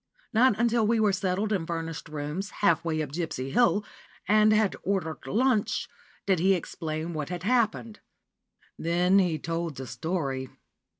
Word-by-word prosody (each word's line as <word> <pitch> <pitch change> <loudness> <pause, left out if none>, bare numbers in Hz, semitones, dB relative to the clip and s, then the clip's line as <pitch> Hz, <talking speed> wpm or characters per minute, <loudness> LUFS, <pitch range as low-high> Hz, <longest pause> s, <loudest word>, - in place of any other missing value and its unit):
Not 225 -1 +4
until 235 -1 +2
we 230 0 +2
were 210 -2 +3
settled 190 +3 0
in 190 -5 0
furnished 165 -3 -4
rooms, 150 +6 -4 0.2
half 170 -3 +4
way 160 -2 -1
up 145 - -7
Gipsy 145 -5 -3
Hill, 210 - +3 0.4
and 215 +2 +5
had 215 -2 +3
ordered 185 -5 -2
lunch, 235 -1 +1 0.4
did 190 -4 +2
he 190 +3 +4
explain 160 -1 -4
what 150 -2 -4
had 180 -1 -5
happened. 225 -1 0 0.8
Then 180 +3 +3
he 175 -4 +1
told 165 0 -3
the 130 - -5
story. 135 0 -3
180 Hz, 155 wpm, -27 LUFS, 160-210 Hz, 0.8 s, and